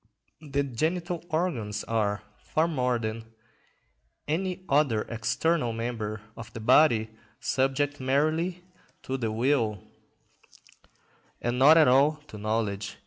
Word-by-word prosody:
The 140 -2 -1
genital 165 +7 -2
organs 145 - -1
are, 105 -3 -1 0.2
far 160 +2 0
more 125 -6 0
than 115 0 -6 0.9
any 185 +4 -2
other 140 -7 +2
external 120 +4 0
member 110 -2 -4
of 115 -1 -9
the - - -6
body, 115 -2 +4 0.3
subject 135 +2 0
merely 155 +7 0 0.4
to 130 - -3
the 115 -4 -2
will, 115 -2 +1 1.6
and 120 +1 -2
not 150 +5 +8
at 155 - +6
all 135 +4 +5 0.2
to 105 - -9
knowledge. 105 -2 -2
125 Hz, 115 wpm, -27 LUFS, 115-155 Hz, 1.6 s, not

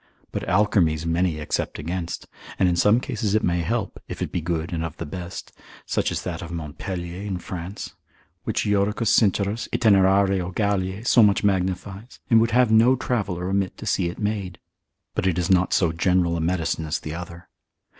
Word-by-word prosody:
But - - -3
alkermes 90 -5 +2
many 85 0 +1
except 75 - -2
against; 85 +2 -4 0.3
in 90 -2 +3
some 105 +7 +4
cases 110 -4 -2
it 110 - +2
may 85 0 +1
help, 80 - -2
if - - -7
it - - -3
be 90 - -2
good 85 +2 -2
and 80 -1 -2
of 80 0 -5
the 85 - -5
best, 90 +4 -7 0.3
such - - 0
as - - -3
that 85 -1 -4
of 85 - -7
Montpelier 85 +3 -5
in 100 -3 -3
France, 90 +2 -7 0.5
which - - -1
Iodocus 105 +2 +1
Sincerus, 105 +1 +2
Itinerario 95 -3 +3
Galliae, 100 0 -1
so 120 - +5
much 105 -1 +4
magnifies, 95 +3 -2
and 115 -1 +7
would 115 - +2
have 120 0 +3
no 115 +4 +6
traveller 100 -9 -2
omit 95 0 -1
to - - -8
see 85 - +1
it 85 - -8
made. 105 -4 -3 0.6
But - - 0
it 90 -3 +1
is 90 +1 0
not 95 0 +3
so 85 -4 +3
general 85 0 +1
a 85 - -2
medicine 80 -1 -1
as 75 - 0
the 75 - -6
other. 85 0 -8
95 Hz, 185 wpm, -24 LUFS, 85-105 Hz, 0.6 s, and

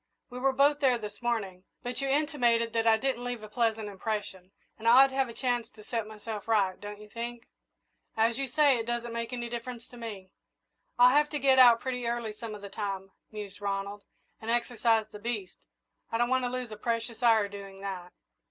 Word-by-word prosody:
We 250 - -6
were 270 +1 +3
both 285 +2 +3
there 260 -4 +4
this 210 -1 -8
morning, 200 -6 -2 0.2
but 245 +2 -3
you've 275 - -1
intimated 245 -6 +2
that 230 0 +1
I 220 0 +6
didn't 255 0 -1
leave 245 -3 -4
a - - -7
pleasant 225 -1 0
impression, 200 -2 -4 0.3
and 225 - -3
I 250 +3 +9
ought 270 - +3
to - - -11
have 270 -2 +1
a - - -6
chance 245 -3 -1
to 215 -1 -15
set 225 -1 -3
myself 215 -1 -7
right, 200 -5 +2
don't 205 0 -7
you 210 - -12
think?" 235 +2 -6 0.7
"As 225 +2 +2
you 275 - -1
say 285 -1 +4
it 225 - -4
doesn't 240 0 -2
make 230 +1 -3
any 240 -1 -3
difference 235 0 -6
to 245 - -13
me." 205 -5 -7 0.7
"I'll 250 +2 +7
have 295 0 +4
to 295 - -1
get 265 -1 +5
out 240 -2 +8
pretty 250 -2 -2
early 235 -2 -2
some 215 0 -7
of 205 - -11
the - - -5
time," 195 -1 -4 0.2
mused 205 -2 -8
Ronald, 200 0 -3 0.4
"and 220 - -6
exercise 235 -2 +2
the 210 - -9
beast. 210 -4 -4 0.5
I 230 - +1
don't 240 +1 +2
want 260 -1 +2
to - - 0
lose 250 -2 -4
a 215 - -7
precious 230 +1 -2
hour 225 -4 +5
doing 195 -1 -10
that." 185 -3 -5
230 Hz, 215 wpm, -29 LUFS, 210-245 Hz, 0.7 s, I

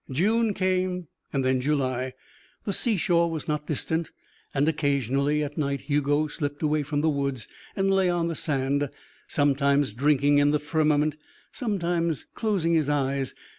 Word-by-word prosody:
June 210 - +2
came, 185 -1 0 0.3
and 130 -2 +1
July. 130 -2 -1 0.5
The 200 - -1
sea 225 +1 +1
shore 170 -1 +2
was 160 -2 -4
not 150 0 -2
distant 160 +2 0 0.4
and 145 +1 +1
occasionally 140 -1 +1
at 145 +1 -5
night 140 -2 -1
Hugo 145 +1 +1
slipped 145 -1 -4
away 155 0 +2
from 145 0 -2
the 160 - +2
woods 140 -4 -2 0.3
and 195 0 +1
lay 190 -1 +3
on 175 -1 0
the 170 - -2
sand, 140 -2 0 0.4
sometimes 140 -3 +2
drinking 145 +3 +3
in 145 0 +4
the 150 - +3
firmament, 150 0 +1 0.3
sometimes 175 - -1
closing 195 -7 0
his 155 -3 +2
eyes. 135 -2 -1
150 Hz, 150 wpm, -26 LUFS, 140-170 Hz, 0.5 s, in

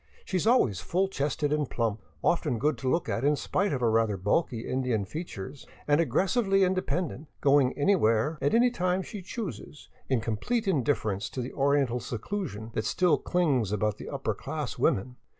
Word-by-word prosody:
She 190 - -4
is 185 - 0
always 130 - +3
full 185 - 0
cheeked 150 -3 -2
and 150 -1 +1
plump, 115 -3 -1 0.2
often 155 -7 +1
good 150 +6 +1
to 130 +1 -1
look 165 - +1
at 115 - -1
in 145 +1 +4
spite 195 +6 0
of 135 -3 -1
her 115 -2 +3
rather 110 -2 +2
bulky 115 - 0
Indian 125 -6 0
features, 140 - -7 0.2
and 145 +2 +4
aggressively 195 +3 +2
inde 185 0 +2
pendent, 160 -4 -2
going 140 -2 +3
anywhere 145 - +2
at 145 +9 +2
any 245 +1 +5
time 185 -4 0
she 205 0 -7
chooses 180 -6 -7 0.2
in 130 -3 +2
complete 115 - -1
indiffer 135 - +1
ence 95 +2 -4
to - - -6
the 125 - -6
oriental 140 -3 +2
seclusion 115 - -5
that 110 - -2
still 165 +1 +2
clings 140 - +1
about 105 0 0
the - - -8
upper - - -2
class - - -5
women. 125 +6 +1
145 Hz, 185 wpm, -28 LUFS, 115-180 Hz, 0.2 s, any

